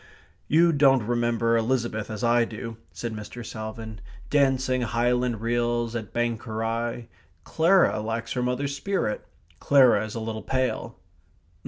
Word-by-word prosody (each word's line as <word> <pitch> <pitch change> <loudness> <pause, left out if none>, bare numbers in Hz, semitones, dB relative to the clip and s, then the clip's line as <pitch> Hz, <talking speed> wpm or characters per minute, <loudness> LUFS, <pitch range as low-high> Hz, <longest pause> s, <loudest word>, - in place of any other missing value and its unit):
"You 165 +3 +5
don't 135 -6 +4
remember 120 0 +1
Elizabeth 115 -2 -1
as 110 +2 -5
I 120 0 +4
do," 115 0 -6
said 115 -2 -5
Mr. 110 +3 -8
Salvin, 110 0 -7 0.3
"dancing 130 -3 +2
Highland 120 0 0
reels 120 0 0
at 110 -4 -5
Banchorie. 115 0 -2 0.4
Clara 170 - +3
lacks 115 +1 -3
her 125 - -1
mother's 130 +3 -1
spirit. 165 - -2 0.4
Clara 130 -7 +5
is 110 +1 -6
a - - -2
little 110 0 -4
pale." 130 -1 -2
120 Hz, 130 wpm, -26 LUFS, 115-130 Hz, 0.4 s, You